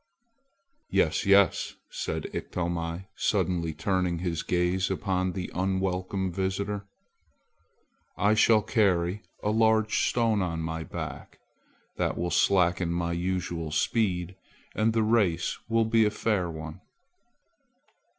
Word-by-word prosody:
"Yes, 80 - +1
yes," 100 -2 +4 0.2
said - - -3
Iktomi, 85 0 -3
suddenly 85 -3 0
turning 90 +1 0
his 85 -1 -2
gaze 90 +1 0
upon 95 -1 -1
the 90 -1 -5
unwelcome 95 0 -1
visitor; 100 +2 -2 1.3
"I 100 +2 +3
shall 110 0 +4
carry 100 -4 +1 0.2
a 105 - +1
large 110 0 +3
stone 115 -4 +1
on 85 -3 -2
my 80 0 -3
back. - - -7 0.6
That - - -1
will 85 0 -2
slacken 90 -2 +2
my 85 0 -1
usual 85 -2 -2
speed; 90 +2 0 0.4
and 110 +1 +1
the 115 -1 +2
race 100 -7 +1
will 115 0 +3
be 110 0 +4
a - - +3
fair 105 -4 -1
one." 80 -1 -8
95 Hz, 115 wpm, -27 LUFS, 85-105 Hz, 1.3 s, yes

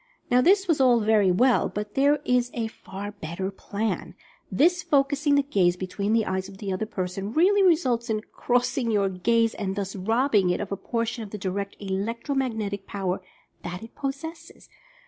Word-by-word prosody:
Now 250 +1 +5
this 390 +6 +4
was 320 -5 +2
all 245 -3 +5
very 210 -2 +4
well, 245 +7 +3
but 210 0 -5
there 285 +2 +3
is 250 -1 +2
a 235 -2 -1
far 205 -2 -7
better 190 0 -5
plan. 205 +2 -4 0.4
This 355 +4 +3
focusing 285 -1 +2
the 285 - +3
gaze 185 -10 +2
between 200 +3 -2
the 225 -1 +3
eyes 190 0 -2
of 195 - -12
the 195 -1 -3
other 215 +4 -2
person, 195 0 -4
really 390 +7 +4
results 260 -10 +2
in 215 -1 0
"crossing" 245 0 0
your 200 -3 +2
gaze, 225 +5 +1
and 195 -2 -3
thus 195 -1 -4
robbing 215 0 +2
it 180 - 0
of 200 - -5
a - - 0
portion 230 +3 -3
of 210 - -8
the 210 - -6
direct 200 +1 -3
electro 205 +7 -3
magnetic 220 -7 -2
power 190 -2 -2 0.4
that 180 +3 -6
it 225 - -11
possesses. 295 +4 -7
220 Hz, 185 wpm, -25 LUFS, 195-260 Hz, 0.4 s, Now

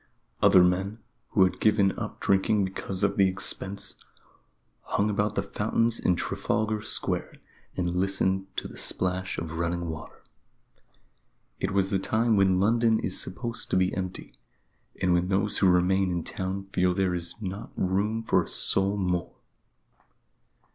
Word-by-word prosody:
Other 90 - +7
men, 95 +4 0 0.3
who 95 - +4
had 95 - 0
given 105 -3 +3
up - - -6
drinking 100 +1 +2
because 95 0 -4
of 100 -1 +1
the 95 - +5
expense, 95 +1 -2 0.8
hung 105 +1 0
about 105 +1 0
the 100 - 0
fountains 110 +3 0
in 90 - +2
Trafalgar 110 +4 -1
Square - - -2 0.4
and 90 -1 -1
listened 95 0 +1
to - - -2
the - - -12
splash 95 0 -1
of 80 0 -5
running 85 0 -2
water. 80 -1 -9 1.4
It - - -1
was 95 0 +1
the 95 - +2
time 110 +3 +1
when 95 -2 +3
London 115 +2 +3
is 95 - 0
supposed 115 +5 -3
to - - +2
be 95 0 +2
empty; 95 0 -5 0.7
and 90 -1 +2
when 90 +1 +2
those 95 +2 0
who 95 - +5
remain 90 +2 +3
in 85 -2 -2
town 95 +1 -4
feel 90 0 +2
there 95 -2 +1
is 85 +4 -4
not 100 -1 -6
room 105 +5 0
for - - +3
a - - -7
soul 100 +1 +2
more. 90 -3 -2
95 Hz, 155 wpm, -27 LUFS, 90-105 Hz, 1.4 s, Other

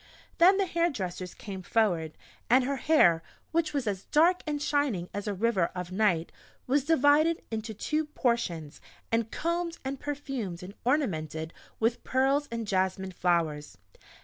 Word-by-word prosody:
Then 370 +3 +7
the 395 - +2
hairdressers 220 - -2
came 195 -3 -7
forward; 175 -7 0 0.3
and 255 +2 +5
her 275 +2 -1
hair, 175 - +4 0.3
which 330 -1 +1
was 280 -4 -1
as 200 -2 -3
dark 340 +4 +4
and 295 -1 -1
shining 285 -12 0
as 205 +1 -4
a 205 - 0
river 200 -3 +2
of 180 0 -5
night, 185 -5 +1 0.3
was 275 +2 +2
divided 310 +2 +4
into 220 0 -4
two 305 +8 -1
portions 235 - -2 0.3
and 225 -1 +1
combed, 340 +3 -2
and 270 0 -3
perfumed, 270 -12 -4
and 190 +2 -8
ornamented 160 - -1 0.3
with 230 +2 0
pearls 270 +3 +2
and 230 -1 -3
jasmine 190 -1 0
flowers. 165 - 0
230 Hz, 150 wpm, -29 LUFS, 185-290 Hz, 0.3 s, Then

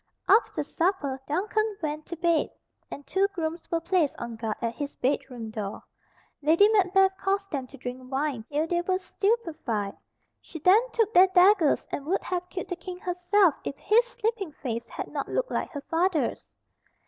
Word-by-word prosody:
After 450 - +3
supper 325 -7 -1
Duncan 420 +6 0
went 305 -1 -4
to 340 - -5
bed, 335 -1 +1 0.4
and 285 - -8
two 390 +6 +2
grooms 330 -1 -4
were 335 - +1
placed 335 -3 +1
on 235 -1 -6
guard 220 -1 -3
at 230 0 -2
his 285 +4 -5
bedroom 250 -4 -2
door. 210 -2 -5 0.6
Lady 325 +7 +5
Macbeth 385 -2 +4
caused 390 0 -1
them 270 -4 -3
to 275 - -13
drink 255 +1 -7
wine 270 -4 -1
till 300 +2 +1
they 345 +1 0
were 370 +1 0
stupefied. 330 - -1 0.5
She 325 - -10
then 365 +8 +6
took 450 -2 +1
their 370 +2 +8
daggers 370 -3 +4
and 285 - -4
would 380 +4 0
have 360 0 -3
killed 370 - -5
the 360 - -2
King 360 +1 -7
herself 360 0 +2
if 275 - -4
his 445 +4 +4
sleeping 450 -8 -3
face 235 -5 -4
had - - -6
not - - -4
looked - - -1
like - - -1
her 285 - -6
father's. 330 +1 0
340 Hz, 175 wpm, -27 LUFS, 280-385 Hz, 0.6 s, their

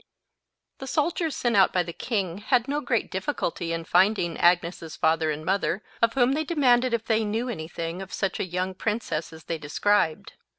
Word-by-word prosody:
The 270 - -7
soldiers 320 +2 0
sent 240 -2 0
out 195 -1 +5
by 180 - +1
the 170 0 -7
king, 195 -6 -2
had 240 +2 +1
no 290 +2 -1
great 240 -4 -1
difficulty 175 -2 -2
in 165 0 -3
finding 180 -1 +2
Agnes's 170 -2 +1
father 160 0 +2
and 155 +1 -3
mother, 195 +1 0 0.2
of 230 0 +3
whom 250 -1 +4
they 305 +3 0
demanded 255 -6 +3
if 230 -1 -1
they 225 -1 +2
knew 225 +4 -2
any 160 -9 -5
thing 165 +1 -5
of 190 -1 -8
such 195 0 -2
a - - +1
young 185 +1 -2
princess 210 -6 -2
as 160 -1 -12
they 165 -1 -4
described. 160 +2 0
195 Hz, 195 wpm, -26 LUFS, 170-240 Hz, 0.2 s, out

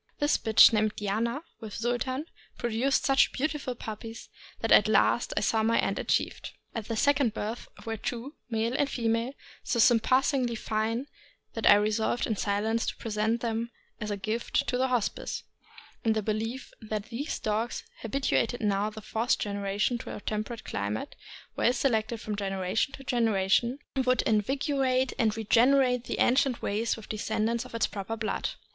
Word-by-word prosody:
This 290 +1 +2
bitch, 220 +1 +7
named 215 -1 +2
Diana, 225 +8 -1 0.2
with 215 -3 -8
Sultan, 245 +5 -1 0.3
produced 240 +4 +1
such 270 -1 +4
beautiful 285 -3 -2
puppies 225 0 -8 0.3
that - - -1
at - - +7
last - - +3
I - - +3
saw 220 - +2
my 225 +1 +2
end - - 0
achieved. - - -1 0.2
At 225 -3 -4
the 230 - -2
second 275 -2 +2
birth 220 +3 -4 0.2
were 225 0 -3
two, 245 +6 -4 0.2
male 225 +1 0
and 280 +1 +1
female, 230 +1 0 0.3
so - - -1
surpassingly 245 +2 +3
fine 225 +3 -1 0.5
that 225 - 0
I - - +10
resolved 215 +3 +1
in 220 - -1
silence 215 +3 0
to - - -2
present 220 +1 -1
them 230 0 -2 0.3
as 210 - -4
a 205 - -2
gift 215 +4 -1
to - - 0
the 260 - +3
Hospice, 245 -5 -2 0.6
in 225 - +3
the 215 -1 -1
belief 225 +5 -3
that 215 -1 -4
these 275 +7 -3
dogs, 220 +2 -2 0.2
habituated 245 0 0
now 205 0 +1
to 215 - -15
the 220 - -7
fourth 225 +3 0
generation 205 +3 -1
to - - -7
a - - -7
temperate 215 +2 -4
cli 100 0 -3
mate, 105 +1 -4 0.4
well 245 - +3
selected 235 -3 0
from 215 -1 -4
generation 195 +4 -1
to 270 - -9
generation, 230 0 +2 0.3
would 255 -1 +2
invigorate 260 +3 +1
and 220 -1 +2
regenerate 250 +3 +3
the - - -3
ancient 255 -1 +3
race 215 +3 0
with 220 - -10
the 215 - -5
descendants 220 +3 -1
of 250 - -10
its 230 - +2
proper 210 +2 -5
blood. 220 -1 -2
225 Hz, 170 wpm, -28 LUFS, 215-250 Hz, 0.6 s, I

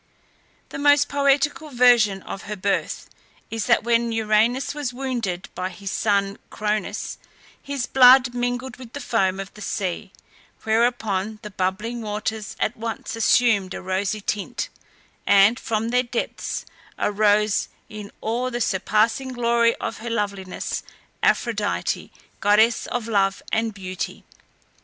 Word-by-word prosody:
The - - -6
most 290 0 +5
poetical 285 +2 +1
version 240 -6 +4
of 195 - -7
her 210 - -2
birth 200 0 -2 0.4
is 225 -2 -2
that 240 - +4
when 235 0 +2
Uranus 225 +4 +2
was 290 -4 -3
wounded 245 -9 -3
by 185 0 -3
his 195 +1 -7
son 200 -1 0
Cronus, 210 0 -3 0.4
his 280 -3 -3
blood 255 -1 +7
mingled 245 +1 -2
with 245 -2 -12
the 285 - -5
foam 195 -7 0
of 195 0 -7
the 210 - -13
sea, 195 -1 -3 0.5
whereupon 220 -3 +1
the 210 - -7
bubbling 205 +6 -2
waters 215 0 -4
at 220 - 0
once 225 0 -5
assumed 225 -4 +3
a - - -6
rosy 190 +3 -1
tint, 205 0 -3 0.6
and 200 +5 +6
from 225 0 -1
their 250 +1 +3
depths 240 -1 -4 0.3
arose, 210 0 +2 0.2
in 210 -1 -9
all 240 +3 -1
the 240 -1 -3
surpassing 220 +4 +1
glory 235 -1 +2
of - - -5
her 235 +2 -5
loveliness, 200 -4 -3 0.4
Aphrodite, - - 0 0.3
goddess 215 +3 +3
of 240 -2 -3
love 195 -3 +1
and 225 0 +1
beauty! 185 -3 -6
220 Hz, 135 wpm, -23 LUFS, 200-245 Hz, 0.6 s, blood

